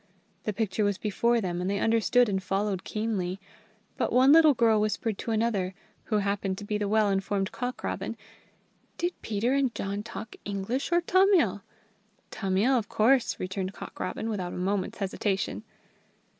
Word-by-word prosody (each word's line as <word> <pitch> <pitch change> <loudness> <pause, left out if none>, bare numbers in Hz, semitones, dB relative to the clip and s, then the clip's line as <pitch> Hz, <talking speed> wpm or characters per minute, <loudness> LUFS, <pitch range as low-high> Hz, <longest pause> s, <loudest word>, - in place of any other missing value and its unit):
The 215 - 0
picture 210 0 -1
was 205 -2 +1
before 235 +3 +1
them, 175 -2 -2
and 180 - -1
they 200 - 0
understood 230 +3 +3
and 190 -2 -1
followed 195 0 -1
keenly; 200 -4 -2 0.6
but - - 0
one 255 +3 +6
little 310 -2 +7
girl 225 -2 +4
whispered 215 0 -1
to - - -5
another, 215 -5 0 0.3
who 215 - 0
happened 200 -1 -1
to 205 - -7
be 210 0 -2
the 205 - -1
well 215 +1 +3
informed 195 0 -1
Cock 250 0 -4
robin: - - -3 0.8
"Did 350 +1 -1
Peter 225 +4 0
and 275 -3 +1
John 200 +1 -3
talk 220 0 -8
English 205 - -3
or 345 0 +4
Tamil?" 375 +1 +3 0.7
"Tamil, 195 +6 +1
of 210 - -7
course!" 245 +3 +2
returned 190 +1 -3
Cock - - -10
robin, 185 +4 -3
without 190 -5 -3
a - - -6
moment's 195 +4 -1
hesitation. 195 0 -2
210 Hz, 165 wpm, -28 LUFS, 195-235 Hz, 0.8 s, little